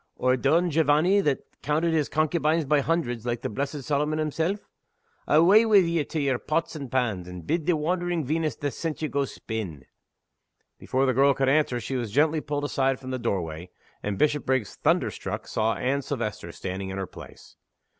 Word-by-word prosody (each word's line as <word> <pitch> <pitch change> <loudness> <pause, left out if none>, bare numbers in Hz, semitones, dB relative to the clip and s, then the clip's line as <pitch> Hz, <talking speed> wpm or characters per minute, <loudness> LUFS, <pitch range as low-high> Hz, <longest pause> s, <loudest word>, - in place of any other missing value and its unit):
or 130 0 +2
Don 160 +7 +2
Jovanny 160 +6 +3
that 145 -7 0 0.2
counted 160 +3 +1
his 155 -3 +1
concubines 155 0 +1
by 150 +1 +3
hundreds, 130 -8 -1
like 120 -1 -3
the - - -1
blessed 140 +4 -3
Solomon 150 +3 0
himself? 160 +6 -1 0.6
Awa' 185 +9 +6
wi' 215 - +4
ye 170 -5 +4
to 155 - -4
yer 135 -4 +1
pots 160 +2 -1
and 140 -5 -6
pans; 110 -9 0
and 90 -2 -9
bid 165 - -1
the 175 - +4
wandering 175 0 -1
Venus 155 -1 -1
that 145 -1 -3
sent 160 +4 -4
ye - - +1
go 140 -1 0
spin!" 100 - -6 0.9
Before 130 +1 0
the 130 - +2
girl 140 +2 +4
could 135 0 +1
answer 140 -4 +2
she 130 +3 -3
was 120 -3 -3
gently 150 +7 +2
pulled 145 -1 -3
aside 135 -2 0
from 130 -1 -7
the 130 - -2
doorway, 85 -5 -3 0.3
and 105 -1 -3
Bishopriggs, 130 -5 +1
thunder - - +1
struck, - - -5
saw 110 0 0
Anne 140 +2 0
Silvester 105 -10 -4
standing 95 +2 -5
in 95 - -5
her 95 - -2
place. - - -13
140 Hz, 185 wpm, -26 LUFS, 120-155 Hz, 0.9 s, Awa